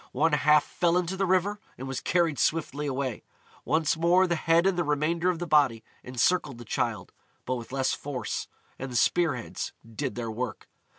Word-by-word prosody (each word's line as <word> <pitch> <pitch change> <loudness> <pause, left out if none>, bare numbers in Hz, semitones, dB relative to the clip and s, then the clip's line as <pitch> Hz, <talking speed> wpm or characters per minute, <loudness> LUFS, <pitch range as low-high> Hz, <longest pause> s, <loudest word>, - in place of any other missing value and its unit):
One 165 - +2
half 150 0 +5
fell 175 0 +1
into 180 +1 -1
the 195 0 0
river, 190 +3 +1 0.2
and 130 - -6
was 135 -1 -3
carried 170 -5 +1
swiftly 150 -2 0
away. 130 -3 -2 0.4
Once 160 -1 +1
more 175 +3 +4
the 175 - 0
head 165 +2 +3
and 195 -1 +3
the 175 - +1
remainder 160 +4 +1
of 180 - 0
the 175 - -4
body 140 -8 +3 0.2
encircled 130 +2 +1
the 120 - -10
Childe, - - -2 0.3
but - - -1
with 120 -2 -6
less 135 -1 0
force, 140 -3 -4 0.3
and 135 0 -5
the - - -6
spear 165 +4 +3
heads 115 - -5 0.2
did 140 0 -3
their 115 -2 -3
work. 120 0 -5
150 Hz, 190 wpm, -27 LUFS, 130-175 Hz, 0.4 s, half